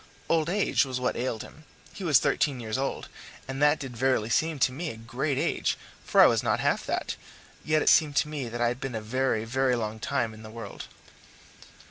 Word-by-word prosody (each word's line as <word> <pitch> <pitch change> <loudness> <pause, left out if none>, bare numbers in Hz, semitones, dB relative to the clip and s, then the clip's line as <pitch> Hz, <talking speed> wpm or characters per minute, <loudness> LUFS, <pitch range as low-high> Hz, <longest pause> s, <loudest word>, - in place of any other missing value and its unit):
Old 165 -1 +2
age 200 +2 +2
was 130 -2 -3
what 125 - 0
ailed 120 -3 -2
him 155 - -14 0.3
he 195 - -8
was 155 -7 +5
thirteen 140 -4 +1
years 110 -2 -4
old, 135 +1 -2 0.4
and 135 +1 -5
that 150 +1 +5
did 130 -4 -7
verily 120 -3 +1
seem 160 +4 +1
to 130 -1 +3
me 160 +5 -4
a 115 - -7
great 125 +5 -2
age, - - 0 0.3
for - - +4
I - - +10
was - - +4
not - - +1
half - - +1
that, - - -2 0.5
yet 155 0 +2
it - - +4
seemed 150 -3 +4
to 155 - +3
me 145 -5 -4
that 120 +1 -5
I 120 - +3
had 125 +1 -4
been 135 -3 -4
a - - -1
very, 115 0 0
very 130 +2 +1
long 110 -2 -3
time 110 0 -1
in 110 - -12
the 110 - -10
world. 110 -2 -8
130 Hz, 220 wpm, -27 LUFS, 115-145 Hz, 0.5 s, I